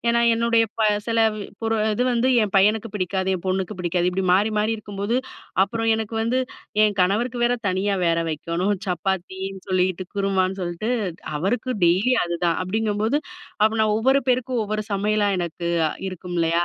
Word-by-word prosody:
ஏனா, 235 Hz, 0 st, +3 dB, 0.2 s
என்னுடைய 230 Hz, 0 st, +3 dB
ப -, -, -2 dB, 0.3 s
சில 230 Hz, -, +1 dB, 0.4 s
பொரு 225 Hz, 0 st, 0 dB, 0.2 s
இது 245 Hz, -, 0 dB
வந்து 240 Hz, +2 st, +2 dB, 0.2 s
என் 200 Hz, -, -6 dB
பையனுக்கு 215 Hz, +3 st, +3 dB
பிடிக்காது. 190 Hz, 0 st, -1 dB
என் 180 Hz, -, -11 dB
பொண்ணுக்கு 190 Hz, +2 st, -1 dB
பிடிக்காது. 175 Hz, 0 st, 0 dB
இப்படி 190 Hz, +1 st, -2 dB
மாறி 205 Hz, +4 st, +2 dB
மாறி 215 Hz, -, +1 dB
இருக்கும்போது, 205 Hz, +2 st, -3 dB, 0.5 s
அப்புறம் 225 Hz, +2 st, -1 dB
எனக்கு 220 Hz, 0 st, -4 dB
வந்து, 245 Hz, +3 st, +1 dB, 0.5 s
என் 210 Hz, -2 st, +1 dB
கணவருக்கு 230 Hz, +6 st, 0 dB
வேற 245 Hz, -, +3 dB
தனியா 195 Hz, +2 st, 0 dB
வேற 165 Hz, 0 st, +2 dB
வைக்கணும். 170 Hz, +6 st, -1 dB
சப்பாத்தீனு 190 Hz, +2 st, -3 dB
சொல்லீட்டு, 185 Hz, 0 st, +1 dB
குருமான்னு 195 Hz, -1 st, 0 dB
சொல்ட்டு, 175 Hz, +5 st, -3 dB, 0.5 s
அவருக்கு 210 Hz, -, -1 dB
டெய்லி 185 Hz, +9 st, +3 dB
அதுதான். 170 Hz, -1 st, 0 dB
அப்டிங்கம்போது, 215 Hz, +5 st, 0 dB, 0.5 s
அப்ப 215 Hz, -, +5 dB
நான், 215 Hz, -1 st, +3 dB
ஒவ்வொரு 265 Hz, +4 st, +3 dB
பேருக்கும் 250 Hz, -1 st, +1 dB
ஒவ்வொரு 215 Hz, +1 st, -2 dB
சமையலா, 205 Hz, +1 st, +1 dB
எனக்கு 170 Hz, 0 st, -4 dB, 0.4 s
இருக்குமில்லையா? 175 Hz, -2 st, -1 dB
200 Hz, 150 wpm, -23 LUFS, 185-225 Hz, 0.5 s, அப்ப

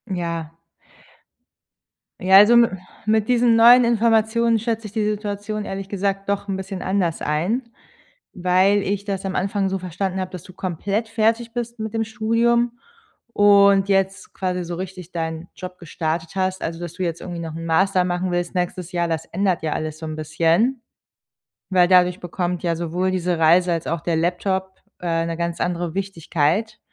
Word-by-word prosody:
Ja. 170 Hz, -2 st, -3 dB, 1.7 s
Ja, 190 Hz, +1 st, +6 dB
also 210 Hz, +4 st, +7 dB
mi 235 Hz, 0 st, +6 dB, 0.4 s
mit 215 Hz, 0 st, +1 dB
diesen 240 Hz, -1 st, +4 dB
neuen 240 Hz, +2 st, +8 dB
Informationen 230 Hz, 0 st, +2 dB
schätze 225 Hz, -1 st, -3 dB
ich -, -, -12 dB
die 215 Hz, 0 st, -1 dB
Situation 210 Hz, 0 st, -3 dB
ehrlich 195 Hz, 0 st, -5 dB
gesagt 195 Hz, 0 st, -2 dB
doch 200 Hz, 0 st, -1 dB
'n 190 Hz, -, -1 dB
bisschen 190 Hz, -1 st, -6 dB
anders 185 Hz, -4 st, -1 dB
ein, 195 Hz, -, -1 dB, 0.6 s
weil 185 Hz, +2 st, +3 dB
ich 200 Hz, +1 st, -2 dB
das 195 Hz, -2 st, -3 dB
am 190 Hz, -, -3 dB
Anfang 195 Hz, 0 st, 0 dB
so 195 Hz, -, -1 dB
verstanden 185 Hz, +1 st, -3 dB
habe, 185 Hz, -1 st, -4 dB
dass 180 Hz, -, -7 dB
du -, -, -13 dB
komplett 195 Hz, +5 st, -2 dB
fertig 225 Hz, +1 st, 0 dB
bist 240 Hz, 0 st, -4 dB
mit 220 Hz, 0 st, -4 dB
dem 225 Hz, -, 0 dB
Studium 235 Hz, +2 st, +1 dB, 0.5 s
und 200 Hz, -1 st, +5 dB
jetzt 195 Hz, -1 st, 0 dB
quasi 180 Hz, -1 st, -2 dB
so 170 Hz, 0 st, -5 dB
richtig 185 Hz, -1 st, -7 dB
deinen 160 Hz, 0 st, -4 dB
Job 185 Hz, -1 st, -8 dB
gestartet 165 Hz, 0 st, -3 dB
hast, 185 Hz, 0 st, -1 dB
also 165 Hz, 0 st, -4 dB
dass 175 Hz, -1 st, -6 dB
du 185 Hz, -, -4 dB
jetzt 170 Hz, -1 st, -3 dB
irgendwie 175 Hz, -2 st, -6 dB
noch 165 Hz, -2 st, -6 dB
'n 165 Hz, 0 st, -6 dB
Master 185 Hz, +3 st, +3 dB
machen 180 Hz, 0 st, -1 dB
willst 175 Hz, +1 st, -2 dB
nächstes 180 Hz, 0 st, -2 dB
Jahr, 175 Hz, -2 st, 0 dB
das 160 Hz, -1 st, -2 dB
ändert 190 Hz, -1 st, -1 dB
ja 155 Hz, -1 st, -1 dB
alles 155 Hz, 0 st, -4 dB
so 160 Hz, -, -6 dB
'n 155 Hz, -, -5 dB
bisschen, 165 Hz, -, +1 dB, 0.9 s
weil 180 Hz, -2 st, +4 dB
dadurch 180 Hz, 0 st, +4 dB
bekommt 175 Hz, 0 st, -3 dB
ja 170 Hz, -1 st, 0 dB
sowohl 175 Hz, +3 st, -1 dB
diese 180 Hz, -2 st, -1 dB
Reise 175 Hz, +3 st, +4 dB
als 165 Hz, -, -3 dB
auch 165 Hz, -1 st, -2 dB
der 170 Hz, 0 st, -1 dB
Laptop, 190 Hz, +3 st, -1 dB, 0.2 s
äh, 165 Hz, -1 st, -1 dB
'ne 165 Hz, 0 st, -4 dB
ganz 170 Hz, 0 st, -3 dB
andere 175 Hz, -2 st, -2 dB
Wichtigkeit. 195 Hz, +2 st, -1 dB
185 Hz, 175 wpm, -22 LUFS, 170-205 Hz, 1.7 s, neuen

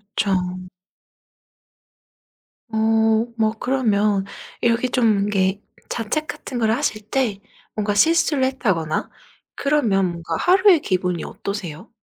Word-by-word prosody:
그쵸. 185 Hz, -2 st, -1 dB, 2.0 s
어 220 Hz, 0 st, +2 dB
뭐 220 Hz, -1 st, +2 dB
그러면 210 Hz, -6 st, +1 dB, 0.4 s
이렇게 235 Hz, +1 st, +2 dB
좀 220 Hz, -5 st, +2 dB
이렇게 195 Hz, 0 st, 0 dB, 0.3 s
자책 305 Hz, +8 st, -2 dB
같은 250 Hz, -3 st, -6 dB
걸 220 Hz, -1 st, +2 dB
하실 225 Hz, -3 st, -1 dB
때 240 Hz, -7 st, 0 dB, 0.4 s
뭔가 205 Hz, -1 st, 0 dB
실수를 310 Hz, +1 st, +3 dB
했다거나 190 Hz, -12 st, -1 dB, 0.5 s
그러면 235 Hz, -10 st, +1 dB
뭔가 170 Hz, 0 st, -4 dB
하루의 370 Hz, -2 st, +5 dB
기분이 180 Hz, -2 st, -1 dB
어떠세요? 200 Hz, +1 st, -6 dB
220 Hz, 230 characters per minute, -21 LUFS, 195-255 Hz, 2.0 s, 하루의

